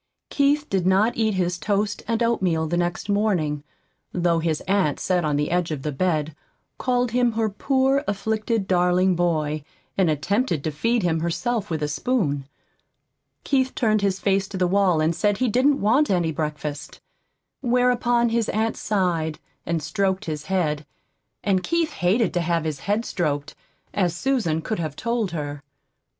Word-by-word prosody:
Keith 290 +1 +2
did 185 -2 0
not 200 +5 +3
eat 220 -3 +1
his 180 -1 0
toast 205 +1 -1
and 230 +1 +1
oatmeal 185 -9 +1
the 165 +2 -1
next 175 +2 -1
morning, 185 -9 0 0.5
though 170 -2 +1
his 160 -2 -1
aunt 190 -7 +1
sat 180 -2 +1
on 150 -2 0
the 150 +2 0
edge 175 -1 +1
of 150 -4 -4
the 150 - -1
bed, 155 -1 -1 0.4
called 250 -2 +1
him 245 -1 +2
her 220 0 +1
poor, 270 +5 +1
afflicted, 215 +1 -1
darling 180 0 +3
boy, 155 -4 0 0.3
and 190 -4 +3
attempted 170 - 0
to 155 - -1
feed 230 +9 0
him 165 -2 +1
herself 210 +6 -1
with 160 -2 -2
a - - +1
spoon. 145 - -1 0.9
Keith 265 -2 +1
turned 215 -3 +2
his 195 -1 0
face 195 -1 +1
to 190 - -6
the 180 - +2
wall 185 -3 +3
and 160 +2 +1
said 205 +1 +1
he 255 - +1
didn't 265 +5 +3
want 260 +9 +3
any 175 -4 +1
breakfast. 150 -1 -4 0.6
Whereupon 245 -1 +2
his 230 -1 0
aunt 220 +1 0
sighed, 175 -7 0 0.3
and 165 -2 -1
stroked 190 +5 0
his 155 -2 -4
head; 155 -6 0 0.6
and 195 -3 +2
Keith 335 - 0
hated 205 +6 +1
to 175 - +1
have 170 -1 0
his 155 -3 -3
head 210 +8 -1
stroked, 150 -4 -2 0.4
as 180 -4 +1
Susan 180 -8 0
could 220 - -2
have 155 -4 -3
told 235 -1 -1
her. 145 -4 -5
185 Hz, 165 wpm, -23 LUFS, 160-225 Hz, 0.9 s, not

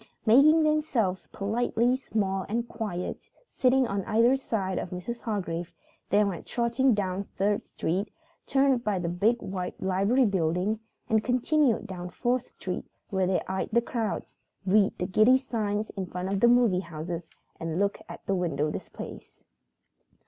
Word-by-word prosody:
Making 295 +8 +6
themselves 290 -12 +1
politely 235 +4 +1
small 195 -7 -1
and 235 +2 -1
quiet, 205 -7 -5 0.2
sitting 260 0 +3
on 200 -2 -2
either 230 +4 +4
side 195 -8 -2
of - - -5
Mrs. 185 +7 -5
Hargrave, 175 -6 -3 0.4
they 205 +1 +4
went 195 -4 -3
trotting 240 +1 +2
down 195 -1 -2
Third 205 +1 +1
Street, 195 +5 -2 0.4
turned 270 -3 +3
by 210 -4 0
the 170 -2 -2
big 210 +7 +1
white 185 -1 -4
library 200 +7 +2
building, 190 +2 0 0.3
and 220 -1 +2
continued 255 +1 +2
down 180 -1 -6
Fourth 245 +6 -1
Street - - -5 0.3
where 190 -2 +1
they 185 - +1
eyed 190 0 -2
the 235 - +4
crowds, 230 -3 -3 0.3
read 200 +1 +3
the 180 - -1
giddy 215 +7 +5
signs 215 -5 -2
in 190 -3 -5
front 180 +2 -3
of 195 - 0
the 240 - +5
movie 240 -6 +4
houses 170 -1 -6 0.3
and 165 0 -3
looked 200 0 0
at - - -10
the 195 - 0
window 165 -5 0
displays. - - -9
205 Hz, 155 wpm, -28 LUFS, 185-240 Hz, 0.4 s, Making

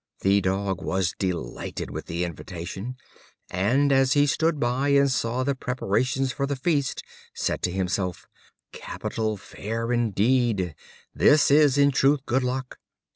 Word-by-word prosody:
The 100 +1 +3
Dog 95 0 -1
was 95 -2 -1
delighted 90 -10 -4
with - - -6
the 85 +1 -2
invitation, 90 - -6 0.6
and 120 +10 +2
as 135 0 +4
he 145 -1 +4
stood 155 +3 +1
by 125 +3 0
and 140 -1 +4
saw 120 +1 0
the 140 +2 +1
preparations 130 +1 -1
for 140 +1 -2
the 140 - -1
feast, 140 0 -1 0.3
said - - -1
to 90 - 0
himself: 95 -1 -2 0.5
"Capital 110 -2 -4
fare 115 +4 -5
indeed! 115 -4 +1 0.4
this 145 -1 +4
is, 145 -2 +5
in 140 0 +5
truth, 135 +1 +2
good 130 +2 +1
luck. 125 0 -3
125 Hz, 140 wpm, -25 LUFS, 95-135 Hz, 0.6 s, is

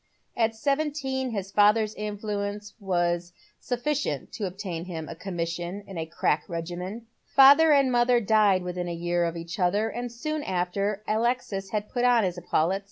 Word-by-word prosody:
At 225 -1 +1
seventeen 275 0 -1
his 200 -4 -4
father's 210 +1 +4
influence 205 -1 -4
was 175 -3 -1 0.3
sufficient 245 - -2
to 205 - -3
obtain 180 -3 -5
him 165 -4 -6
a - - -6
commission 175 +1 -4
in 195 - -10
a 160 - -3
crack 155 -2 0
regiment. 180 +5 -5 0.2
Father 285 +4 +7
and 275 -3 +4
mother 240 0 +4
died 210 -4 +3
within 180 0 -4
a 170 - -3
year 175 +1 0
of 170 0 -3
each 170 +3 -7
other, 200 +5 +2
and 240 +1 -5
soon 305 +6 -3
after 195 0 -1
Aloxis 220 -3 -1
had 210 +1 -2
put 245 +2 -2
on 245 -2 +5
his 180 -2 -1
epaulettes. 175 +2 +1
205 Hz, 165 wpm, -26 LUFS, 175-235 Hz, 0.3 s, Father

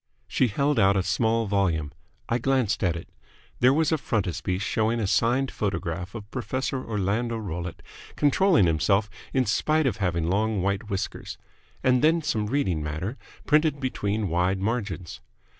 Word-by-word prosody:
She 125 - +2
held 140 +4 +1
out 95 0 +4
a 95 - +1
small 115 +2 +1
volume. 90 -7 0 0.4
I 120 - 0
glanced 125 -5 +1
at 85 -3 +2
it. 85 - -7 0.5
There 125 +1 +6
was 155 +3 +2
a 160 - +2
frontispiece 95 -3 -1
showing 110 +3 0
a 110 - 0
signed 125 +7 +2
photograph 90 -1 -3
of 105 -1 -8
Professor 130 0 -2
Orlando 110 +3 -1
Rollitt 90 -4 -5 0.3
controlling 155 - +4
himself 95 +6 +2 0.2
in 130 -1 +2
spite 155 +8 +1
of 115 -6 0
having 85 -5 0
long 105 +1 +1
white 100 +3 -1
whiskers, 95 -2 -4 0.5
and 125 -1 +3
then 165 +1 +4
some 110 -8 -1
reading 105 - 0
matter, 80 - -3 0.3
printed 150 -1 +3
between 105 -5 -1
wide 90 +3 +1
margins. 100 -5 -3
105 Hz, 155 wpm, -26 LUFS, 95-130 Hz, 0.5 s, There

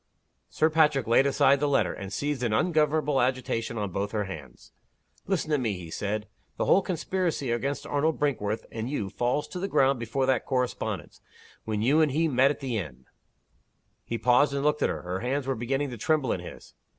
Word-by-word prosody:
Sir 155 +1 +2
Patrick 150 -5 +3
laid 120 +4 +4
aside 140 0 +4
the 145 - +1
letter, 140 - +2
and 100 0 -7
seized 145 +3 -2
in 120 -3 0
ungovernable 150 0 +2
agitation 120 -2 -1
on 100 -3 -2
both 100 +3 -3
her 105 -1 0
hands. 75 -10 -10 0.6
"Listen 180 -5 -1
to 150 - +3
me," 115 -5 0
he 90 -3 -8
said. 105 +3 -3 0.3
"The - - 0
whole 195 - +5
conspiracy 175 -7 -2
against 140 +4 -2
Arnold 150 +2 0
Brinkworth 110 -7 -1
and 115 +2 -4
you 105 -9 -3
falls 125 +5 -1
to 180 - -6
the 195 - -2
ground 135 -5 +3
before 120 +4 -1
that 130 -2 +1
correspondence. 125 -2 -2 0.4
When 110 -1 -1
you 145 +7 +4
and 155 -3 +3
he 165 +3 +2
met 135 -1 +4
at 145 - -3
the 125 -5 -1
inn 65 -8 -8 0.5
" - - -43 0.2
He 115 - -3
paused, 125 +5 +3
and 140 - -1
looked 150 0 +1
at - - +3
her. - - -4
Her 90 +1 -3
hands 130 +4 -1
were 135 - 0
beginning 135 +4 -2
to 120 - -6
tremble 150 0 +1
in - - -1
his. 90 - -11
130 Hz, 205 wpm, -27 LUFS, 110-145 Hz, 0.6 s, whole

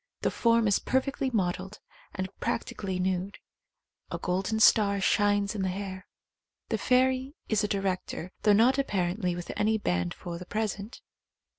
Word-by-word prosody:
The - - +1
form 230 -1 +3
is 200 - +3
perfectly 265 +1 0
modelled 190 -2 -2 0.4
and 190 -1 -2
practi - - -2
cally 190 -2 -3
nude. 185 +1 -1 0.7
A - - -3
golden 190 +4 -1
star 205 -2 +5
shines 205 +1 +2
in 205 - -3
the 190 - 0
hair. 190 0 -5 0.6
The - - 0
fairy 260 +2 +2
is 215 -1 +2
a - - +1
director, 190 -3 -2
though 210 - +5
not 240 +6 +5
appar 185 -10 0
ently 180 -5 -1
with 175 0 -6
any 220 +1 +2
band 90 - -1
for 170 -1 -7
the 180 - -8
present. 215 0 -3
200 Hz, 160 wpm, -28 LUFS, 185-220 Hz, 0.7 s, star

